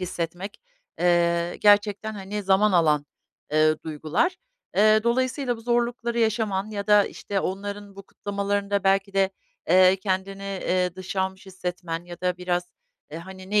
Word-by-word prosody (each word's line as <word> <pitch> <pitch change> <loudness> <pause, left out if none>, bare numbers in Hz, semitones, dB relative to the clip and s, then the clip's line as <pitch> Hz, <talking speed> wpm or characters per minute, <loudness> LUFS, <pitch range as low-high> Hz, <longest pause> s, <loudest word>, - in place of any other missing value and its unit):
hissetmek, 180 - -5 0.4
eee, 170 -1 +2
gerçekten, 205 +1 +3
hani, 205 +1 -5
zaman 195 +2 +3
alan, 150 -4 +3 0.5
eee, 155 0 +4
duygular. 160 - -1 0.4
Eee, 215 +1 +6
dolayısıyla 255 +1 0
bu - - -12
zorlukları 235 0 -1
yaşaman 215 -2 0
ya 200 -1 -4
da, 210 -1 +6
işte, 200 -2 -3
onların 200 +1 -5
bu 200 - -9
kutlamalarında 200 0 -2
belki 195 +1 +2
de, 195 -1 +2 0.4
eee, 185 +2 +6
kendini, 195 0 -3
eee, 185 -2 -1
dışlanmış 190 +1 -4
hissetmen 180 -2 -5
ya 175 0 -10
da 180 -1 0
biraz, 180 0 -2 0.4
eee, 160 - -6
hani, 190 +2 -11
"Ne 210 0 +4
195 Hz, 140 wpm, -25 LUFS, 180-205 Hz, 0.5 s, Eee